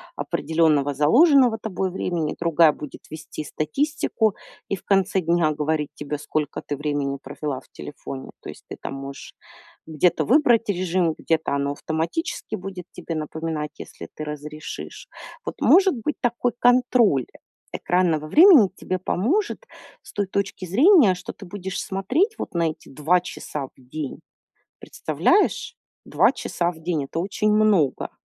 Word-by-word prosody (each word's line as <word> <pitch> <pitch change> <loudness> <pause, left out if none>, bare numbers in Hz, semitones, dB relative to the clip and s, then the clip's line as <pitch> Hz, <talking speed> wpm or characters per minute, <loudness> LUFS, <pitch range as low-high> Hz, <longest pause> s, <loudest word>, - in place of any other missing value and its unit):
определённого 155 -3 +1
заложенного 245 - +5
тобой, 190 -3 -2
времени. 170 -4 -2
Другая 165 -1 +4
будет 150 -1 -9
вести 155 0 -7
статистику 235 - -1 0.3
и - - -1
в 185 - -14
конце 195 0 +2
дня 170 -2 +2
говорить 150 0 -1
тебе, 150 0 -5
сколько 150 0 -3
ты 145 - -3
времени 145 -1 -2
провела 145 -4 -5
в - - -25
телефоне. 135 -2 -8
То - - -9
есть - - -11
ты - - -6
там - - -5
можешь 135 0 -9 0.5
где-то 160 +2 +1
выбрать 240 -4 +4
режим, 180 -3 +1
где-то 160 -3 0
оно 140 0 -1
автоматически 160 - -3
будет 185 -1 -7
тебе 175 -1 -6
напоминать, 155 0 -4
если - - -9
ты 155 - -5
разрешишь. 150 0 -7 0.4
Вот, - - -4
может 380 -2 +5
быть, 250 +6 -3
такой 245 0 0
контроль 245 - +4 0.5
экранного 170 -4 +1
времени 310 - +8
тебе 185 -1 -3
поможет 345 - -1 0.4
с - - -13
той 205 -1 -1
точки 195 -1 -3
зрения, 245 - +5
что 180 - -7
ты 200 - -12
будешь 190 0 -5
смотреть 285 - 0
вот - - -6
на 170 -2 +1
эти 155 - -15
2 155 +6 +2
часа 150 -5 -6
в - - -26
день. 135 +2 -7 0.6
Представляешь? 370 - 0 0.3
2 - - +4
часа 175 0 -2
в 160 - -15
день- 160 -3 -1
это 135 - -5
очень 200 +4 0
много. 210 -10 +2
175 Hz, 145 wpm, -23 LUFS, 150-215 Hz, 0.6 s, времени